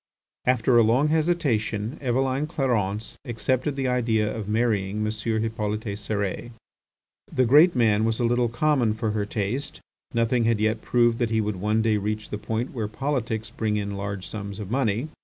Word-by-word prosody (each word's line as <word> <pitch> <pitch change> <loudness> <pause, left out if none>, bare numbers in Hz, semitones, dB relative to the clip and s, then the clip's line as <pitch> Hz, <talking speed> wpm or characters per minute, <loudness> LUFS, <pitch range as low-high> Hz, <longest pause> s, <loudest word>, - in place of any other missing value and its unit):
After 125 -1 +4
a - - +7
long 125 +7 +3
hesitation 140 -8 0
Eveline 130 +2 0
Clarence 110 - -1
accepted 130 +3 -1
the 135 -1 -1
idea 115 -4 +1
of 105 -2 -5
marrying 105 -2 0
M. 105 - 0
Hippolyte 110 -1 -2
Cérès. 100 +1 -3 0.8
The 130 - +2
great 150 +8 +6
man 110 -3 +3
was 115 0 0
a - - +1
little 120 0 +2
common 120 -3 +1
for 110 -1 -1
her 105 -1 -2
taste. 110 +7 -3 0.3
Nothing 115 0 +1
had 115 -2 +2
yet 110 +1 +1
proved 120 -1 +2
that 120 -2 +1
he 110 0 +1
would 105 -2 -1
one 105 +3 +1
day 110 -2 +2
reach 105 +1 -3
the 105 - -3
point 115 +3 -3
where 110 -5 -2
politics 115 -2 -2
bring 110 -2 -1
in 100 -1 -2
large 100 -1 -4
sums 100 -2 -6
of 105 -2 -7
money. 125 +1 0
110 Hz, 175 wpm, -25 LUFS, 105-125 Hz, 0.8 s, a